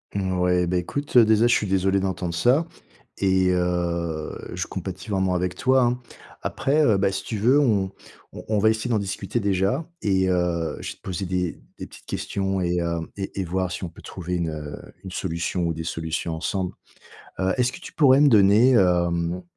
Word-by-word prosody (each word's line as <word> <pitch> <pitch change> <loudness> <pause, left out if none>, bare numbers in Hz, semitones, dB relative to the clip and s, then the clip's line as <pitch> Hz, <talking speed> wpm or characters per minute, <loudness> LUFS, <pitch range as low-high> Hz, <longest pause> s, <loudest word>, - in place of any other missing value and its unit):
Mouais, 90 -2 +1
bah, 90 - 0
écoute, 130 +10 -1
heu, 115 - +8
déjà 110 +2 +4
je 120 - +4
suis 105 - +1
désolé 95 +1 +2
d'entendre 95 -2 -2
ça, 125 - +3 0.5
et 95 -1 +2
heu, 85 -3 -1 0.2
je - - -2
compatis 95 +3 -6
vraiment 95 -2 +1
avec 90 0 -1
toi, 130 0 +3
hein. 125 +1 0 0.4
Après, 150 +3 +1
heu, 110 -7 +4
bah, 95 0 +2
si - - -4
tu 110 - -3
veux, 125 +8 +4
on 100 -8 +2 0.4
on - - -8
on 110 - +1
va 110 - +4
essayer 110 +2 -1
d'en 110 -3 +2
discuter 100 +3 -3
déjà 100 - 0 0.2
et 95 -2 +2
heu, 85 -2 0
je - - -5
vais - - -10
te - - -38
poser 95 0 -4
des 90 -1 -2 0.2
des - - -7
petites - - -16
questions 95 -1 -2
et 90 0 0
heu, 85 0 -1 0.2
et 95 0 -4
et - - -1
voir 90 +1 -1
si 90 - -5
on 90 - -3
peut 85 - -15
trouver 90 -1 -5
une, 85 -2 -1
heu, 75 -1 -6 0.3
une 95 - -8
solution 85 0 -2
ou 85 -1 0
des 80 - -5
solutions 80 0 -3
ensemble. 90 +3 -2 0.7
Heu, 95 0 +1
est-ce 125 0 +2
que - - -10
tu - - -11
pourrais 135 -3 +5
me 145 - +6
donner, 105 +3 +6
hem, 85 -4 +2
95 Hz, 205 wpm, -24 LUFS, 90-105 Hz, 0.7 s, heu